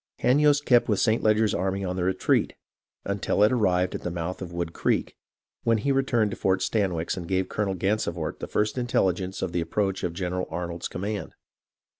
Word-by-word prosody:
" - - -39
Hanyost 145 +2 +4
kept 120 -2 +4
with 105 - +2
St. 110 0 +2
Leger's 110 -1 +3
army 95 +2 -1
on 90 0 -2
the 90 - -1
retreat, 95 +1 +1 0.5
until 100 0 +1
it 105 - +5
arrived 90 -7 +2
at - - -4
the - - -3
mouth 85 +2 -4
of 90 -2 -6
Wood 85 -1 -3
Creek, - - 0 0.5
when 115 -1 +3
he 140 +6 0
returned 125 -6 +2
to - - -5
Fort 95 -1 +1
Stanwix 90 -6 0
and 85 -2 -5
gave 95 0 0
Colonel 100 -2 -1
Gansevoort 90 -4 -1
the - - -5
first 105 +4 0
in 120 - -2
telligence 95 -4 0
of 90 - -2
the 85 - 0
approach 95 +3 -1
of 85 - -1
General 90 0 -2
Arnold's 85 +1 -4
command. 105 +2 -4
95 Hz, 200 wpm, -26 LUFS, 90-110 Hz, 0.5 s, it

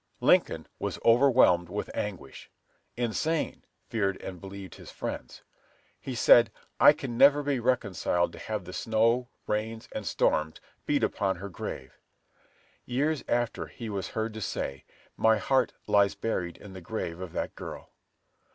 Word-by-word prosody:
Lincoln - - +3
was - - -3
overwhelmed 115 -8 +5
with 105 +3 -4
anguish; 95 -10 -5 0.5
insane, 125 +7 -1 0.2
feared 100 -4 -1
and 90 -2 -8
believed 95 -2 -8
his - - -12
friends. - - -6 0.6
He 130 - -6
said, 115 0 +6 0.3
"I - - +9
can 125 -5 -5
never 145 +2 +7
be 140 -2 0
reconciled 105 -8 0
to - - -10
have 105 -4 -4
the 90 - -8
snow, 115 +4 +2 0.2
rains, 110 +1 -3
and - - -5
storms 80 0 +1 0.3
beat - - +2
upon 95 -2 0
her 100 +3 -7
grave." 65 -7 -7 0.8
Years 145 +5 0
after 120 -1 -1
he 115 -3 -7
was 100 -2 -3
heard 110 0 -1
to 110 - -7
say, 70 -8 -4 0.3
"My 110 0 +4
heart 130 +5 +2
lies 100 -1 +3
buried 90 -6 -3
in 100 -2 -12
the 95 - -9
grave 85 -3 -4
of 90 -2 -6
that - - -3
girl." - - -9
110 Hz, 150 wpm, -28 LUFS, 95-120 Hz, 0.8 s, I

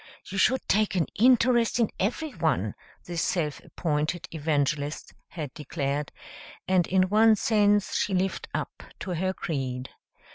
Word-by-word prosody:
"You 195 - -4
should 260 +7 +2
take 210 -1 +2
an 175 - +2
interest 240 0 +4
in 230 - +2
everyone," 175 - -1 0.3
this 170 -1 -3
self 155 -6 -1
appointed 155 +1 -2
evangelist 145 -1 -1
had 150 -6 -6
declared, 145 -1 -3 0.6
and 185 -2 +3
in 185 0 +3
one 215 +3 +5
sense 205 -1 +2
she 195 - 0
lived 190 +1 -1
up - - -4 0.2
to 190 - -4
her 185 +2 0
creed. 130 -8 -4
180 Hz, 135 wpm, -27 LUFS, 150-210 Hz, 0.6 s, one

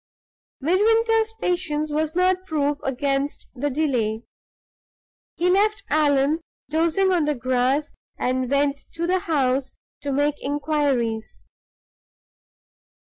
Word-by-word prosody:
Midwinter's 445 - +3
patience 310 -4 -1
was 310 +2 -1
not 370 +1 +2
proof 290 -3 0
against 275 +2 -2
the 280 +3 -2
delay. 245 -7 0 1.1
He 345 +2 0
left 405 +2 +2
Allan 295 +1 +3 0.3
dozing 335 +5 +2
on 345 -4 +2
the 300 0 0
grass, 255 +3 0 0.2
and 255 0 -1
went 280 0 +1
to 335 0 -2
the 370 +2 +2
house 275 -6 0 0.3
to 285 -1 -3
make 290 +2 0
inquiries. 280 -6 -1
295 Hz, 105 wpm, -23 LUFS, 275-340 Hz, 1.1 s, Midwinter's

